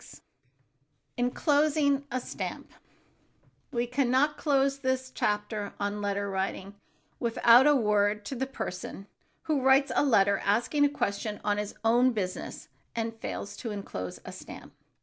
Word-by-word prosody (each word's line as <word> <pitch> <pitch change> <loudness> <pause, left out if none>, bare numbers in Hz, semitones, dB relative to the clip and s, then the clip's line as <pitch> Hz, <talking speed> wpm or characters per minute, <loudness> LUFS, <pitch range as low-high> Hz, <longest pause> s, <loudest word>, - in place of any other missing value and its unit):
[Sidenote: - - -14 1.0
ENCLOSING 285 +2 +2
A 255 - -1
STAMP] - - -6 1.0
We 240 -2 0
can 250 +1 0
not 285 +4 +3
close 275 -2 +1
this 260 -1 -1
chapter 210 -1 -2
on 205 +1 -2
letter 200 0 -1
writing 195 0 -3 0.5
without 235 +2 +5
a 295 - +6
word 210 -3 +2
to - - -5
the 265 +2 -2
person 195 -6 -6 0.4
who 305 -4 0
writes 265 +1 +4
a - - +4
letter 200 -7 +4
asking 240 +8 +2
a - - +3
question 210 -5 -2
on 205 0 +1
his 210 0 -4
own 240 +3 +4
business, 185 -4 -4 0.3
and 225 0 -2
fails 205 - -5
to 230 - -5
enclose 145 - -6
a - - -7
stamp. - - -11
235 Hz, 145 wpm, -28 LUFS, 205-270 Hz, 1.0 s, a